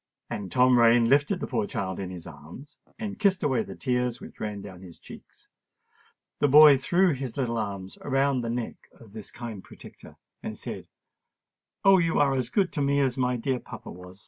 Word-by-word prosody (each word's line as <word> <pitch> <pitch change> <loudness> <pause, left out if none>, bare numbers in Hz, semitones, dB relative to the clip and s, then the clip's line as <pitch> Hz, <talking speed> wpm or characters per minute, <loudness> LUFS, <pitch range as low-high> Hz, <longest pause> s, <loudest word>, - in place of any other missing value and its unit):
And 100 -2 -5
Tom 125 -1 +4
Rain 115 0 +5
lifted 145 +7 +2
the - - -1
poor 110 -6 -2
child 95 -4 -4
in 95 -2 -4
his 90 -2 -9
arms 85 - -12 0.2
and 210 -3 -6
kissed 195 -2 +2
away 135 -4 +1
the - - -8
tears 125 -2 -1
which - - -12
ran 105 -2 -4
down 95 -3 -11
his 90 -3 -12
cheeks. - - -15 0.9
The 145 - +3
boy 145 0 +8
threw 180 +4 +2
his 130 -2 -6
little 115 -4 -1
arms 100 -3 -6
around 135 -1 +1
the 115 - -4
neck 120 0 -5
of 110 -4 -16
his 110 -2 -8
kind 115 -6 -8
protector, - - -14 0.3
and - - -6
said, - - -7 1.0
"Oh! 195 -1 +7
you 165 -2 +1
are 140 -2 +3
as 130 -3 -2
good 190 0 0
to 145 - -2
me 140 0 +2
as 130 -3 +1
my 125 -1 0
dear 125 +2 -2
papa - - -10
was." 90 +1 -12
125 Hz, 200 wpm, -26 LUFS, 105-140 Hz, 1.0 s, boy